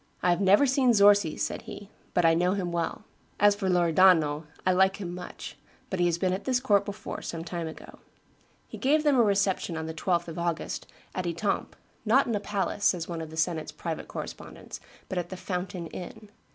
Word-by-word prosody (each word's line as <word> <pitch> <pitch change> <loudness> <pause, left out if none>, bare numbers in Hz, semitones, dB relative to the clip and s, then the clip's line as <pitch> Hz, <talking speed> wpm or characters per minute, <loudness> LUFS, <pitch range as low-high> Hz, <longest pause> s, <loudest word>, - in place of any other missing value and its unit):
"I 180 - +4
have 175 +2 +1
never 200 +8 +5
seen 260 -2 +3
Zorzi," 200 -5 +5
said - - -2
he, 205 0 -9 0.2
"but 175 -2 +3
I 165 - +6
know 180 +3 +2
him 185 -3 -2
well; 170 +4 -2 0.4
as 205 0 +6
for 200 -2 -2
Loredano, 170 -3 +4 0.2
I 185 - +4
like 190 +1 +3
him 175 -4 -5
much; 180 0 -8 0.4
he 175 -1 +2
has 170 -1 +1
been 185 +1 0
at 190 - -4
this 255 -2 +2
court 210 -6 +2
before, 205 0 -6
some 165 -1 -5
time 170 -1 -4
ago." 160 - -11 0.7
He - - -9
gave 300 +3 +3
them 295 -2 +4
a - - +6
reception 195 -5 +1
on 160 - -4
the 160 - -5
12th 170 +1 0
of 165 0 -6
August, 170 -1 -3 0.3
at 185 -1 -3
Etampes, 175 +4 -2 0.3
"not 240 +5 +4
in 235 - -2
a 205 - 0
palace," 205 0 -3
says 170 -3 +2
one 170 -2 -4
of 160 - -6
the 160 - -10
senate's 160 -1 -1
private - - -5
correspondents, - - -8 0.3
"but 185 - -2
at 175 - -5
the 185 - -6
Fountain 180 -1 -4
inn. 205 +5 -9
185 Hz, 205 wpm, -28 LUFS, 170-205 Hz, 0.7 s, I